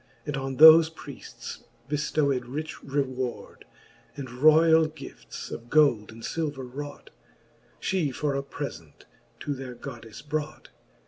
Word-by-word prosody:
And 150 -2 -3
on 135 -1 -4
thofe 160 +1 +9
Priefts - - -9 0.2
bcftowed 145 -3 0
rich 155 +5 -5
reward; 130 -3 -3 0.5
And 130 -3 -6
royall 155 +4 +5
gifts, 155 0 -10
of 120 +1 -8
gold 140 -9 +3
and 115 +1 -12
iilver 145 -5 -3
wrought, 145 +1 -8 0.7
She 180 -6 0
for 140 +2 -2
a 140 - -1
prefent 135 - -8 0.4
to 145 - -2
their 130 -2 -7
GoddefTe 115 +3 -10
brought. 155 0 -4
145 Hz, 125 wpm, -27 LUFS, 130-155 Hz, 0.7 s, thofe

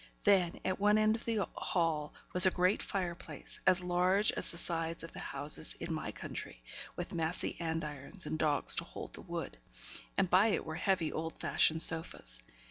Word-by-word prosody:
Then, 190 -4 +3
at 185 - -1
one 210 +1 +4
end 215 0 +3
of 230 - -7
the 220 -4 0
hall, 160 -4 -1 0.2
was 180 +1 +8
a - - +7
great 185 +2 +1
fire 180 -3 -2
place, 170 - -8
as 185 0 +5
large 180 +3 +2
as - - -4
the 170 - -5
sides 165 -1 -2
of 165 - -8
the - - -9
houses 145 +3 +2
in 165 0 -5
my 155 - -4
country, - - -8 0.3
with - - -5
massy 165 +1 -1
andirons 160 +1 -4
and 155 - -3
dogs 150 -3 +1
to - - +3
hold - - -8
the - - -7
wood; - - -6 0.6
and - - +3
by 185 +4 +5
it 215 - 0
were 160 - -5
heavy, 170 -1 0
old 160 +1 -4
fashioned 160 +1 +4
sofas. 160 - +2
170 Hz, 190 wpm, -33 LUFS, 160-190 Hz, 0.6 s, was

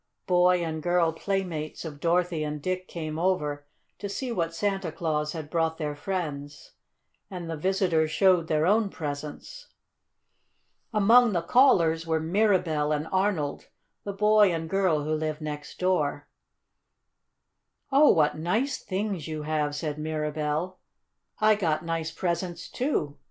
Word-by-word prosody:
Boy 180 -1 +3
and 160 -1 -3
girl 175 -1 +2
playmates 170 -4 -3
of 145 -3 -7
Dorothy 170 -1 +1
and 150 0 -3
Dick 185 +4 -3
came 155 -2 -5
over 150 -5 -1 0.3
to 200 - -5
see 250 +5 -4
what 170 -7 -1
Santa 195 -2 -1
Claus 155 -2 -2
had 160 -3 -6
brought 160 -1 0
their 150 -2 -3
friends, 145 -4 -5 0.6
and 180 -3 -6
the 165 - -3
visitors 175 -2 +1
showed 180 -1 +3
their 155 0 +1
own 210 +2 +3
presents. 150 - -7 1.2
Among 230 +2 +5
the 170 -2 0
callers 165 -8 +4
were 160 -1 +1
Mirabell 165 -4 +1
and 150 +1 -1
Arnold, 185 -7 0 0.4
the 200 - -4
boy 210 0 +4
and 165 -1 -3
girl 180 -5 +1
who 155 +1 -1
lived 155 -1 -2
next 150 -1 -6
door. 155 -6 0 1.6
"Oh, 285 +2 +6
what 150 -3 +3
nice 215 - -1
things 190 -4 -3
you 155 -1 -4
have!" 150 -1 -1
said 150 0 -4
Mirabell. 155 +3 -2 0.6
"I 215 0 +5
got 165 -6 -1
nice 165 -1 -2
presents, 175 0 -3
too. 150 - -2
165 Hz, 140 wpm, -27 LUFS, 155-190 Hz, 1.6 s, Oh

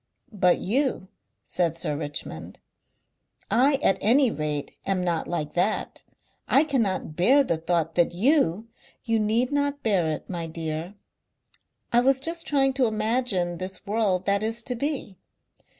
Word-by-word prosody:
"But 180 -3 +3
you," 245 -3 -1 0.3
said 170 -3 -1
Sir 150 -3 -3
Richmond. 145 -1 -7 0.9
"I 275 +4 +4
at 195 0 +3
any 250 +4 +4
rate 150 -4 -4
am 190 -2 -1
not 170 -2 -1
like 155 -4 -3
that. 185 +5 -1 0.5
I 275 - +5
cannot 225 - -1
bear 255 - +5
the 170 -11 -1
thought 165 0 -1
that 175 -1 +2
YOU 220 - +2 0.2
" - - -28
"You 225 -1 +1
need 225 +5 +1
not 285 0 -1
bear 195 -7 +2
it, 155 - -4
my 170 -3 -4
dear. 160 +3 -5 1.0
I 240 - +6
was 265 +2 +3
just 330 +4 -2
trying 270 -2 +2
to 250 - +5
imagine 215 -5 -1
this 190 +2 -7
world 200 -3 0
that 200 0 +1
is 225 +2 -2
to 250 - -3
be. 265 - -4
205 Hz, 150 wpm, -25 LUFS, 175-255 Hz, 1.0 s, I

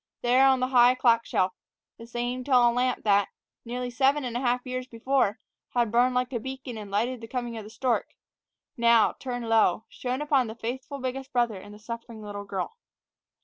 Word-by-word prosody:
There, 255 +3 +5
on 265 -1 +3
the 255 - +1
high 250 -1 +6
clock 230 -2 +3
shelf, 185 0 +1 0.5
the 230 - -10
same 245 +1 -3
tall 245 -3 +4
lamp 250 +1 0
that, 200 -2 +3 0.4
nearly 245 +1 -4
seven 275 +3 +2
and 245 -2 -4
a - - 0
half 250 0 0
years 255 0 -4
before, 230 -3 0 0.4
had 240 -3 +2
burned 250 +2 +3
like 250 +1 0
a 235 - -1
beacon 265 0 -7
and 210 -2 -7
lighted 230 +5 -1
the 225 - -8
coming 240 -1 -4
of 220 - -6
the 210 - -11
stork, 240 +1 -1 0.6
now, 235 -1 +4
turned 245 -3 -4
low, 220 -2 +3
shone 255 +3 -3
upon 275 -5 +2
the 220 - -7
faithful 255 +5 -5
biggest 265 +1 -5
brother 235 -6 0
and 205 - -12
the 210 - -11
suffering 230 0 -8
little 205 -1 -6
girl. 200 - -4
245 Hz, 195 wpm, -27 LUFS, 225-255 Hz, 0.6 s, high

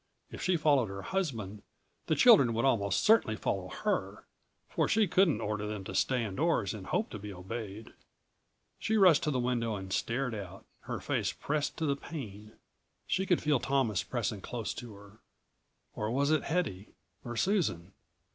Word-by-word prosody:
If - - -8
she 185 -2 +2
followed 145 -6 +3
her 100 0 -6
husband 115 - -3 0.5
the 155 - +2
children 145 - +6
would 115 - +1
almost 100 -7 +2
certainly 225 +1 +4
follow - - -2
her, - - -2 0.4
for - - 0
she 220 -2 +3
couldn't 170 - +3
order 105 -1 -2
them 105 -2 -4
to 95 - -7
stay 125 +4 +1
indoors 110 - 0
and 100 -4 -8
hope 220 - -1
to 105 - -6
be 105 +1 -7
obeyed. 105 +3 -7 0.9
She 220 - +1
rushed 180 -7 +6
to - - +1
the 130 -4 0
window 120 -3 0
and 95 -1 -6
stared 125 +1 -1
out, 95 -3 -8 0.2
her - - -4
face - - -1
pressed 150 0 -2
to 160 - -1
the 140 -2 +1
pane. 110 -9 -8 0.5
She 190 +1 -1
could 180 - +2
feel 150 -3 +3
Thomas 125 -7 +1
pressing - - -3
close - - -4
to 115 -4 -9
her 100 +1 -16 0.7
or 105 - -3
was 140 +5 +1
it 155 -2 +2
Hedy 145 - -2 0.3
or 120 -1 -6
Susan? 110 - 0
120 Hz, 175 wpm, -31 LUFS, 105-155 Hz, 0.9 s, children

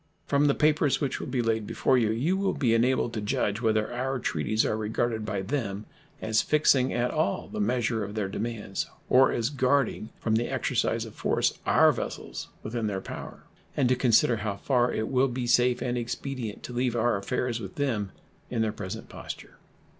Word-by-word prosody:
From 145 +1 +3
the 140 - +3
papers 150 -2 +3
which 140 -3 -1
will - - -5
be 125 -3 0
laid 110 -2 0
before 130 - +2
you 115 -4 +3
you 130 +12 +1
will 195 0 0
be 120 -5 +2
enabled 120 0 +2
to 110 - -3
judge 105 +1 -1
whether 110 0 +1
our 130 +2 -1
treaties 110 0 0
are - - 0
regarded 110 0 -1
by 100 -2 -2
them 105 -3 -3 0.4
as 110 0 +2
fixing 140 -4 +3
at 120 +1 0
all 100 - 0
the - - -6
measure 115 0 0
of 100 +1 -6
their 105 -3 -1
demands 105 -1 -3 0.2
or 130 +1 +6
as 120 +3 -1
guarding 135 -4 +1
from 110 -1 +1
the 120 - -1
exercise - - 0
of - - -10
force - - 0
our - - +6
vessels - - -5 0.2
within 110 0 -2
their 100 -2 -2
power, - - -8 0.3
and 130 -4 +3
to 130 - +4
consider 120 -1 +4
how 105 -1 -2
far 125 +3 +1
it 110 - -2
will 130 0 +3
be 125 -1 -3
safe 125 0 +3
and 125 -1 -1
expedient 120 -2 -5
to 125 - -7
leave 120 0 0
our 120 0 +2
affairs 120 +4 -2
with 95 -4 -8
them 110 -9 -1 0.4
in 115 -2 0
their 110 -1 -1
present 105 +3 -6
posture. - - -9
120 Hz, 195 wpm, -27 LUFS, 110-130 Hz, 0.4 s, or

